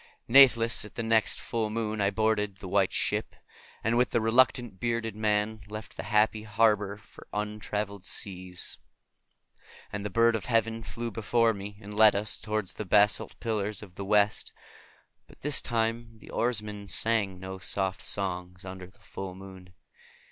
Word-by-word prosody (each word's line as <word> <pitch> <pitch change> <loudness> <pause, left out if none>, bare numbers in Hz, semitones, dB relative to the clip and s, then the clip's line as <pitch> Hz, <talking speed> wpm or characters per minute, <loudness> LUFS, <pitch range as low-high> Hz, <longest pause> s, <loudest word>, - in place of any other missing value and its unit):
Natheless 115 -3 +6
at 105 - -10
the 115 - -2
next 110 -1 +2
full 115 -2 -2
moon 110 -1 -2
I 100 - +3
boarded 105 -2 0
the 95 - -9
White 95 0 +2
Ship, - - -1 0.5
and 115 +1 +1
with 125 - +3
the 120 - +1
reluctant 115 -2 +2
bearded 115 -2 -2
man 105 0 0
left 105 +1 -8
the - - -5
happy 110 0 +3
harbor 105 -2 +1
for 105 - -16
untraveled 105 -1 -3
seas. 90 -2 -1 1.1
And 100 0 -3
the 105 - -3
bird 115 +3 +3
of 110 - -3
heaven 115 -1 +1
flew 115 +1 -5
before, 115 +2 +2
and 100 0 -8
led 110 -1 +6
us 100 +1 0
toward 105 -3 -2
the 110 - -2
basalt 105 +2 +2
pillars 105 -3 -1
of 95 -4 -13
the 100 - -6
West, 105 +1 +2 0.8
but - - -19
this 145 0 +1
time 115 0 -2
the - - -14
oarsmen 105 -4 -2
sang 100 -2 +1
no 95 +1 -7
soft 95 0 -1
songs 90 -2 -3
under 95 -1 -8
the 95 - -23
full 95 -2 -8
moon. 95 -1 -12
105 Hz, 160 wpm, -28 LUFS, 100-115 Hz, 1.1 s, Natheless